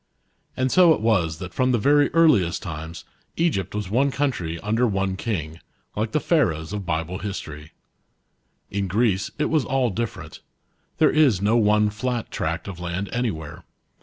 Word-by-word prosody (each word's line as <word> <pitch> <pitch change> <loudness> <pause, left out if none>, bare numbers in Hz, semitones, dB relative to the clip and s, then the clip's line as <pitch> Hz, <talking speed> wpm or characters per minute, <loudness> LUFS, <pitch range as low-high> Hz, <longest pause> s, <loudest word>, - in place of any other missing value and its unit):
* - - -41
And 130 0 0
so* 180 -3 +6
it - - -7
was 90 -9 +1
that 90 +2 -8
from 130 0 +1
the - - +3
very 145 +6 +3
earliest 110 - +3
times 80 -2 -7 0.3
Egypt 120 - 0
was 105 -3 -4
one 135 +5 +3
country 120 - -2
under 115 +4 +1
one 95 -2 -1
king, 85 -7 -4 0.4
like 110 +1 -2
the 155 - +1
Pharaohs 85 - 0
of 100 -3 -5
Bible 80 +4 -2
history. 75 -7 -7 1.0
In 100 0 -1
Greece 100 0 +1
it 150 - -1
was 155 -3 +2
all 130 -3 0
different. 115 +3 -5 0.6
There - - +4
is 140 -10 +4
no 105 +4 +2
one 105 -2 +3
flat 120 +2 -3
tract - - -3
of 95 -3 -7
land 90 +3 -4
anywhere. 105 -12 -3
105 Hz, 165 wpm, -23 LUFS, 90-125 Hz, 1.0 s, so